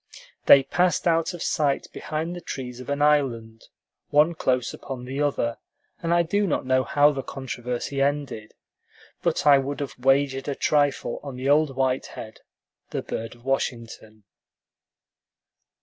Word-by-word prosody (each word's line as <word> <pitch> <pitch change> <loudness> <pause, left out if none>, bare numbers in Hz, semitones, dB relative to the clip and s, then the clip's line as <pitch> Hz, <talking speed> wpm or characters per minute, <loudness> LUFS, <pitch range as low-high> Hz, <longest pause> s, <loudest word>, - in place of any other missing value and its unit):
They 140 - +9
passed 180 +4 +1
out 165 0 +2
of 175 - -5
sight 145 -4 0
behind 160 +3 -4
the 175 - -7
trees 125 -5 -6
of 130 - -9
an 140 +1 0
island, 120 -7 +1 0.4
one 150 +3 +4
close 130 -6 0
upon 125 -2 -7
the 135 +3 -4
other, 125 -5 0 0.4
and 170 -1 -1
I 170 0 +4
do 200 +4 0
not 150 - -1
know 130 0 +2
how 145 +2 +4
the 135 -2 -4
controversy 125 +1 -4
ended; 140 -6 -2 0.7
but - - 0
I 140 -2 +7
would 140 +1 -4
have 140 -2 -4
wagered 135 +1 +2
a 140 - -2
trifle 145 -5 +1
on 140 -3 -7
the 130 +2 -2
old 145 -2 +3
white 130 -1 0
head, 110 -1 -10 0.5
the - - -3
bird 115 +1 -5
of 120 +1 -21
Washington. 115 -5 -3
135 Hz, 155 wpm, -25 LUFS, 125-150 Hz, 0.7 s, They